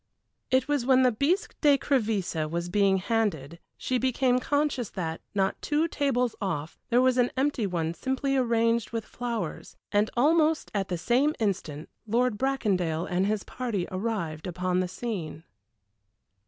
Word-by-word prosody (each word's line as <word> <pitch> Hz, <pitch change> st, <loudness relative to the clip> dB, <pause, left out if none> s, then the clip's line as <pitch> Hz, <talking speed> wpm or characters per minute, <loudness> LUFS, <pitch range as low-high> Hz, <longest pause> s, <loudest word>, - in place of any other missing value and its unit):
It 260 Hz, 0 st, +2 dB
was 290 Hz, -4 st, +1 dB
when 260 Hz, +1 st, +4 dB
the 250 Hz, -, +5 dB
bisque 355 Hz, -, 0 dB
d'écrevisses 225 Hz, -, +1 dB
was 170 Hz, +2 st, -3 dB
being 195 Hz, 0 st, +3 dB
handed 185 Hz, -, -1 dB, 0.2 s
she 255 Hz, -1 st, -1 dB
became 255 Hz, 0 st, +2 dB
conscious 285 Hz, -4 st, 0 dB
that, 165 Hz, -3 st, -4 dB
not 195 Hz, -1 st, 0 dB
two 300 Hz, +2 st, +1 dB
tables 255 Hz, -6 st, 0 dB
off, 165 Hz, -5 st, -3 dB
there 245 Hz, +2 st, +4 dB
was 255 Hz, -1 st, +3 dB
an 245 Hz, -, +3 dB
empty 265 Hz, -5 st, +1 dB
one 165 Hz, -3 st, -2 dB
simply 265 Hz, +6 st, -1 dB
arranged 230 Hz, -2 st, +2 dB
with 225 Hz, -2 st, -3 dB
flowers, 235 Hz, -9 st, -5 dB
and 205 Hz, +1 st, +2 dB
almost 310 Hz, +4 st, +3 dB
at 195 Hz, -2 st, -1 dB
the 180 Hz, -, -2 dB
same 255 Hz, -, +2 dB
instant 175 Hz, -8 st, -2 dB, 0.2 s
Lord 240 Hz, +1 st, +2 dB
Bracondale 190 Hz, -12 st, 0 dB
and 185 Hz, +2 st, 0 dB
his 210 Hz, -1 st, -1 dB
party 230 Hz, -8 st, -3 dB
arrived 185 Hz, -6 st, -3 dB
upon 180 Hz, +1 st, -1 dB
the 185 Hz, -, 0 dB
scene. 180 Hz, -6 st, -5 dB
225 Hz, 150 wpm, -27 LUFS, 185-260 Hz, 0.2 s, the